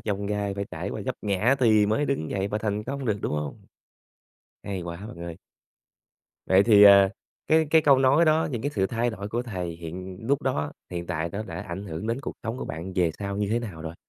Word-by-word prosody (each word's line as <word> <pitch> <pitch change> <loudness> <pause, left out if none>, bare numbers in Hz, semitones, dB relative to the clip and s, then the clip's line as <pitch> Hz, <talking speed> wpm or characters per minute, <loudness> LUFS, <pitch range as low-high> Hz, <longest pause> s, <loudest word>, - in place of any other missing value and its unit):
chông 100 -1 -3
gai, 100 -1 -2
phải 100 0 -3
trải - - -4
qua - - -5
vấp - - -1
ngã 105 +6 +2
thì 110 -5 +4
mới 110 +8 +1
đứng 140 - -2
dậy 100 0 -1
và 105 - -2
thành 105 0 -2
công 140 +2 -4
được, 110 -4 0
đúng - - -1
hông? 75 -1 -4 1.0
Hay 95 -3 -4
quá 85 0 -6
bạn 110 -5 -10
ơi. 85 -1 -6 1.1
Vậy 95 +1 +5
thì, 105 -2 +6
ờ, 100 -1 +9 0.4
cái 160 0 +4
cái 160 0 +5
câu 140 -2 +6
nói 135 +5 +5
đó, 155 0 +3
những 120 -5 -3
cái 145 - -1
sự 95 -8 0
thay 120 +3 -1
đổi 100 -2 -6
của 120 +3 -2
thầy 95 -8 -4
hiện 90 +3 -7
lúc 140 +1 +1
đó, 130 - -1 0.2
hiện 85 -1 -4
tại 85 -1 -2
nó 105 - -3
đã 90 -4 -6
ảnh 85 +3 -6
hưởng 85 +2 -5
đến 115 +3 -1
cuộc - - -5
sống 115 +2 -3
của - - -4
bạn 85 +5 -6
về 90 -3 +2
sau 100 -1 -4
như 105 0 -1
thế 115 - +2
nào 95 -9 -7
rồi? 80 0 -6
100 Hz, 240 wpm, -26 LUFS, 90-120 Hz, 1.1 s, ờ